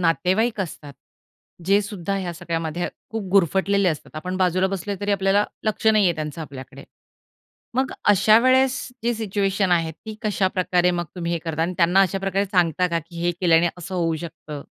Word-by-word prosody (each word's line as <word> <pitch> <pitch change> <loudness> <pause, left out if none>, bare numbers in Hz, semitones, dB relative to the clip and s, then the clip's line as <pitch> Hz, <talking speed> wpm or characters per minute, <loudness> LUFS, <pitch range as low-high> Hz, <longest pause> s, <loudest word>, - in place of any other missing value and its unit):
नातेवाईक 190 +6 +1
असतात, 150 -5 -6 0.7
जे 200 +3 +4
सुद्धा 200 -2 -4
ह्या 180 -3 -3
सगळ्यामध्ये 165 0 -3 0.2
खूप 220 -4 -4
गुरफटलेले 195 +1 +3
असतात. 155 -4 -4
आपण 180 +4 -4
बाजूला 185 0 +2
बसले 195 +1 -3
तरी 205 0 0
आपल्याला 195 +1 +2 0.2
लक्ष 215 +1 -1
नाहीये 210 -5 +5
त्यांचं 155 0 -5
आपल्याकडे. 135 -1 -10 0.9
मग 260 +1 0 0.2
अशा 210 +2 +6
वेळेस 260 +2 +3 0.3
जी 240 +1 +1
सिच्युएशन 200 -3 0
आहे, 165 -2 +2
ती 220 +7 -10
कशाप्रकारे 185 -3 +1
मग 175 -1 -2
तुम्ही 170 -1 -2
हे 170 - 0
करता? 160 -1 -3
आणि 180 +2 -1
त्यांना 175 +2 +4
अशा 195 0 +2
प्रकारे 195 +1 0
सांगता 180 -2 +2
का, 170 -1 0
की 170 +1 -10
हे 175 - +2
केल्याने 170 -1 +4
असं 180 +2 -7
होऊ 165 -2 0
शकतं? 155 -3 -8
185 Hz, 170 wpm, -23 LUFS, 170-200 Hz, 0.9 s, अशा